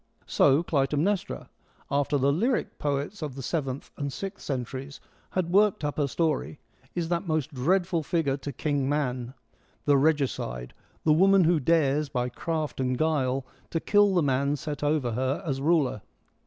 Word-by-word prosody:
So 145 +3 +4
Clytemnestra 150 - 0 0.2
— - - -31
after 145 +1 0
the 140 +1 +3
lyric 235 - 0
poets 145 +7 -2
of 150 -4 -4
the 135 - -6
seventh 135 -3 -3
and 140 -1 -3
sixth 195 +7 -6
centuries 135 +1 -4 0.4
had 175 -2 0
worked 205 -2 +3
up 145 0 -2
her 145 -2 +2
story 155 0 -1 0.2
— 130 +1 -32
is 170 -2 -2
that 170 +1 -1
most 155 -1 -1
dreadful 175 +5 +1
figure 155 -3 0
to 140 +1 -6
King 140 0 -1
Man, 130 -3 -2 0.5
the 145 -1 +5
regicide, 135 - 0 0.3
the 155 - +5
woman 195 +3 +5
who 165 0 +3
dares, 150 -1 +2
by 125 -2 -1
craft 155 +3 -3
and 130 -1 0
guile, 135 -4 +1 0.2
to 165 - -1
kill 205 +1 +4
the 175 - +3
man 140 +1 +1
set 150 0 -5
over 145 -5 +1
her 130 +4 -1
as 135 -4 -2
ruler. 145 - +2
145 Hz, 170 wpm, -27 LUFS, 135-165 Hz, 0.5 s, the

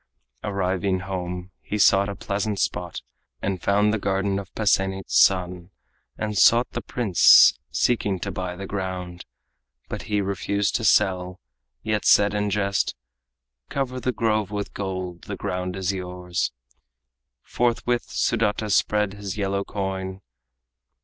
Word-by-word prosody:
Arriving 95 -1 -1
home, 90 -1 -5
he 105 - -4
sought 100 -1 +4
a 100 - -4
pleasant 100 +1 -2
spot, 85 -1 -2 0.4
And 95 +3 -3
found 105 +1 +2
the 110 - 0
garden 100 0 0
of 95 -2 -9
Pasenit's 95 -2 0
son, 90 -1 +3 0.5
And 105 -1 -3
sought 115 +4 +5
the 120 - -4
prince, 110 -8 +6
seeking 105 -5 +1
to - - -3
buy 90 -1 -4
the 100 +2 -7
ground. 95 -2 -5 0.6
But - - -4
he 105 -1 +1
refused 100 +1 -1
to 115 - -6
sell, 95 -3 +2 0.4
yet 110 -1 -1
said 105 0 +5
in 105 0 0
jest: 100 0 0 0.7
"Cover 130 -2 -2
the 130 - -1
grove 110 -4 0
with 105 -1 -4
gold, 95 -3 -5
the - - -5
ground 90 0 -3
is 95 +1 -1
yours." 90 -1 -3 0.9
Forthwith 120 0 0
Sudata 105 -1 0
spread 105 0 +2
his 100 -1 -6
yellow 100 -1 -1
coin. 95 -1 -4
100 Hz, 135 wpm, -24 LUFS, 95-105 Hz, 0.9 s, prince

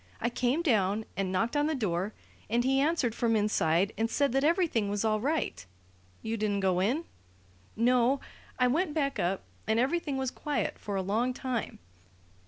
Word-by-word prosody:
I 235 - -1
came 255 +7 0
down 215 - +2
and 195 -1 -1
knocked 225 +8 0
on 290 +1 +2
the 315 - 0
door, 200 -4 -1 0.3
and 235 +2 +2
he 270 +1 +2
answered 285 -5 +1
from 230 -1 +1
inside 200 -3 +2
and 225 +1 +1
said 280 +2 +1
that 270 +2 +1
everything 310 - +2
was 205 +2 -1
all 215 -1 +2
right 290 - -1 0.3
" 90 0 -32
"You 225 +1 -2
didn't 205 -2 0
go 185 -2 +2
in?" 255 - +1 0.7
"No. 245 +3 +3 0.4
I 250 - +3
went 300 +5 +1
back 280 -3 0
up, 185 +2 0 0.2
and 220 +1 +2
everything 280 +2 0
was 265 -1 -1
quiet 295 -1 -2
for 205 - -4
a 190 - 0
long 230 +6 0
time. 255 -4 -3
235 Hz, 185 wpm, -29 LUFS, 205-275 Hz, 0.7 s, No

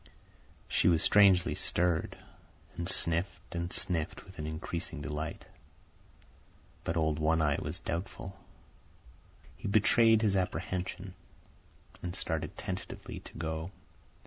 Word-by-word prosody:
She - - +2
was 85 -2 +4
strangely 100 -4 +6
stirred, 90 -2 +1 0.6
and 85 +1 -2
sniffed 85 0 0
and 85 +1 -2
sniffed 85 -2 -2
with 95 -3 -13
an 75 - -3
increasing 80 +1 -4
delight. 75 +2 -4 1.4
But 80 - -1
old 80 -2 +1
One 80 +1 +3
Eye 75 -2 +2
was - - -3
doubtful. 95 +3 -4 1.2
He - - -6
betrayed 110 +2 +5
his 100 -3 +3
apprehension, 95 0 -2 0.9
and 90 0 -4
started 80 -4 -2
tentatively - - -5
to - - -12
go. 80 +1 -3
85 Hz, 115 wpm, -32 LUFS, 80-95 Hz, 1.4 s, strangely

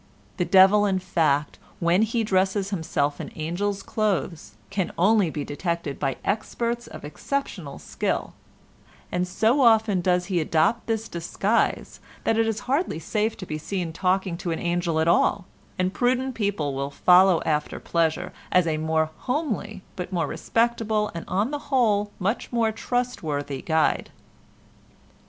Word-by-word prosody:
The 180 - +1
devil, 195 +3 +6
in 190 -1 +1
fact, 150 -5 0 0.2
when 170 +3 +3
he 225 +1 +1
dresses 195 0 +1
himself 160 -5 -1
in - - -6
angel's 195 +6 -2
clothes, 180 - -2 0.2
can 190 -3 -1
only 195 0 +4
be 150 -1 -4
detected 170 -1 -3
by 135 -2 -1
experts 235 +3 -2
of - - -9
exceptional 170 - -4
skill, - - -3 0.8
and 180 0 0
so 225 +9 +2
often 220 -5 +4
does 180 0 +1
he 185 -2 0
adopt 160 +8 +1
this 225 -1 -1
disguise 195 +6 -1 0.2
that 225 - +2
it 225 0 +2
is 225 -1 -2
hardly 275 - -1
safe 210 +7 -1
to 185 - -7
be 155 -3 -4
seen 175 0 -3
talking 185 0 0
to 175 - -4
an 165 - -1
angel 175 -2 0
at 160 - +1
all, 185 +3 +3 0.3
and 185 +1 0
prudent 255 +1 +1
people 200 - -1
will 140 +1 -3
follow 180 +3 +5
after 150 -1 -1
pleasure 165 -2 -1 0.2
as 180 -1 +4
a 160 -2 0
more 160 0 0 0.2
homely 225 - -2
but 180 0 -5
more 175 -3 0
respectable 225 -2 0
and 170 - -6
on 205 +8 0
the 290 - -2
whole 215 -6 +2
much 200 +5 -2
more 230 -2 +2
trustworthy 160 - -3
guide. 160 -1 +1
190 Hz, 150 wpm, -25 LUFS, 165-220 Hz, 0.8 s, devil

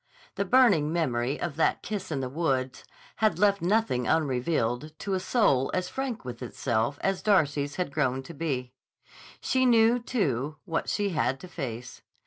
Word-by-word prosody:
The 200 - -2
burning 200 - +4
memory 135 -5 0
of 165 -4 -4
that 165 - +1
kiss 200 -5 -4
in 140 -3 -1
the 130 - -2
woods 130 -3 -2 0.3
had 215 -6 +2
left 200 0 +3
nothing 180 - +1
unrevealed 145 -1 0
to 195 - -3
a 190 - +1
soul 185 - +2
as 180 0 -1
frank 265 - -4
with 120 -1 -7
itself 120 +1 -1
as 195 -1 0
Darcy's 145 -8 +2
had 180 -5 -2
grown 135 -3 0
to 150 - -10
be. 135 -5 -3 0.7
She 260 0 +1
knew, 235 -1 +5
too, 155 - -1
what 165 - -2
she 205 -1 0
had 135 -6 0
to 185 - -9
face. 125 -8 -6
155 Hz, 165 wpm, -27 LUFS, 130-200 Hz, 0.7 s, knew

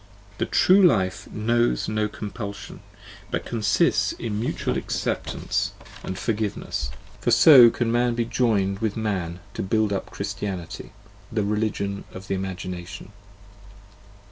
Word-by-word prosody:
The - - 0
true 190 +2 +5
life 95 - +2
knows 120 +2 +1
no 110 0 0
compulsion, 105 -1 -7 0.5
but - - -3
consists 105 -3 +2
in 105 -3 -4
mutual 115 - -1
acceptance - - -2 0.3
and 95 - -4
xv - - -9
forgiveness: 105 - -2 0.3
for - - -1
so 130 -7 +9
can 115 0 -1
man 120 0 +2
be 120 0 0
joined 100 -5 +1
with 110 -1 -1
man 90 -5 -2
to - - -4
build 105 +1 +1
up 95 - -3
Christianity, 95 -5 -5 0.4
the 110 -2 0
religion 100 -1 -2
of 95 +1 -10
the - - 0
Imagination. 90 0 -5
105 Hz, 130 wpm, -24 LUFS, 95-115 Hz, 0.5 s, so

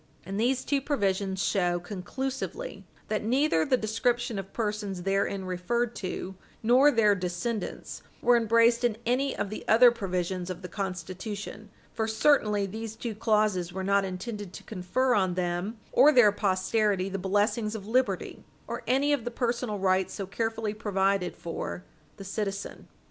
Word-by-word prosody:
And 195 +3 -4
these 255 +3 +1
two 280 -1 +1
provisions 195 -8 0
show 175 -3 +1
conclusively 260 - -5 0.2
that 215 -1 -1
neither 250 - +2
the 255 - +2
description 235 0 0
of 195 0 -7
persons 210 -4 -3
therein 195 0 0
referred 215 +7 -1
to 185 0 -4 0.3
nor 255 +6 +6
their 225 -6 +4
descendants 185 +4 -4 0.2
were 245 0 +4
embraced 230 +1 +4
in 235 -3 +1
any 255 +3 +1
of 200 - -2
the 215 - -5
other 240 +2 +7
provisions 185 -4 -3
of 185 0 -6
the - - -4
Constitution, 195 +3 -5 0.2
for 220 -1 -1
certainly 220 -3 +3
these 220 +3 -6
two 230 0 -4
clauses 210 -5 +1
were 190 +1 -4
not 200 +1 +3
intended 195 +1 -5
to - - -9
confer 225 +6 0
on 185 -4 +2
them 180 +4 -2
or 300 - +7
their 245 -7 +6
posterity 195 0 +1
the 195 0 -3
blessings 210 +3 0
of 200 -3 -6
liberty, 250 +4 0 0.2
or - - -5
any 280 +3 +3
of 280 -5 0
the 240 - -2
personal 235 -2 -1
rights 190 -1 +1
so 195 - -4
carefully 225 +1 -2
provided 195 -3 0
for 170 +1 -5 0.3
the 195 - -8
citizen. 200 0 -4
210 Hz, 155 wpm, -28 LUFS, 190-235 Hz, 0.3 s, other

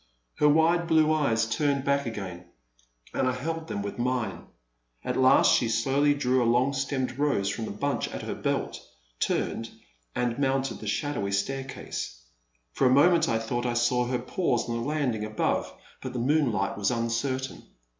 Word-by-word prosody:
Her 150 - +5
wide 165 +3 +3
blue 155 -1 +4
eyes 115 -8 +2
turned 140 +4 0
back 140 -1 +1
again, 95 -6 -6 0.7
and 130 - +1
I 130 - +1
held 160 +5 -4
them 100 - -3
with 100 - -6
mine. 120 -5 -2 0.6
At - - -2
last 130 0 +5
she 120 - +1
slowly 135 +6 +2
drew 130 -2 +1
a - - +3
long 125 +3 +2
stemmed 135 -2 -2
rose 140 -10 +1
from 110 +3 -3
the - - -5
bunch 140 +8 -1
at - - -6
her - - -3
belt, - - -2 0.4
turned, 115 0 -1 0.5
and 120 +1 -1
mounted 135 -1 0
the 110 - -7
shadowy 110 -2 -1
staircase. 130 - -3 0.5
For 130 - +2
a - - +4
moment 165 +4 +5
I 115 - +2
thought 120 +2 -2
I 120 - -1
saw 120 +1 +2
her 125 0 0
pause 125 -6 -1
on 115 - -2
the 115 - -2
land 145 -2 0
ing 110 -1 -4
above, 110 0 -1 0.3
but 130 -1 -6
the - - -4
moonlight 120 -7 +1
was 100 - +2
uncertain. 125 +3 -2
130 Hz, 175 wpm, -27 LUFS, 115-140 Hz, 0.7 s, Her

